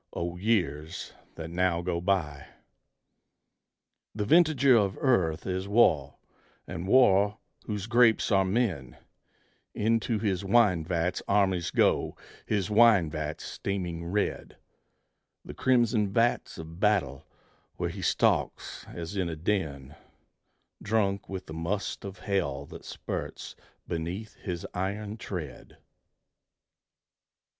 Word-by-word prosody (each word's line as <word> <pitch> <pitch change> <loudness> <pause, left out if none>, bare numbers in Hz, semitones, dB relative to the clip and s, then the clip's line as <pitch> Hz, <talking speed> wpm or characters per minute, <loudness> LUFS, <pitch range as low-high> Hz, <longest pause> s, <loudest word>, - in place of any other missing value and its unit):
O 85 0 -3
years 90 -5 -1 0.2
that 80 0 -7
now 85 -1 +1
go 85 -1 -2
by! 80 -7 -1 1.7
The 105 -1 -1
vintager 145 -2 +5
of 100 -3 +2
Earth 90 - +1
is 95 +1 -2
War, 80 - +3 0.5
is - - -5
War 100 -3 +4 0.3
whose 105 -2 -3
grapes 115 -1 +4
are 95 -1 +4
men; 95 - -1 0.8
Into 115 +1 +1
his 100 -3 -1
wine 100 -5 +3
vats 85 +1 -1
armies 95 -4 +2
go, - - +1 0.3
his 100 -3 0
wine 105 -7 +5
vats 75 -1 -4
steaming 90 -4 -4
red: 100 +5 -2 0.9
The - - -8
crimson 120 -5 +2
vats 115 +3 +1
of 80 +1 -9
battle 95 -11 +1 0.5
where - - -2
he - - -7
stalks, - - 0
as 85 +3 -7
in 90 -3 -1
a 80 - -4
den, 75 -6 -2 0.9
Drunk 100 -2 0
with 95 -1 -5
the 80 - -9
must 85 +6 -3
of 100 -1 -7
Hell 75 -9 -1
that - - -12
spurts - - -6 0.3
beneath 85 +6 -4
his 90 -4 -5
iron 100 +3 -3
tread. 80 - -7
95 Hz, 115 wpm, -28 LUFS, 85-105 Hz, 1.7 s, vintager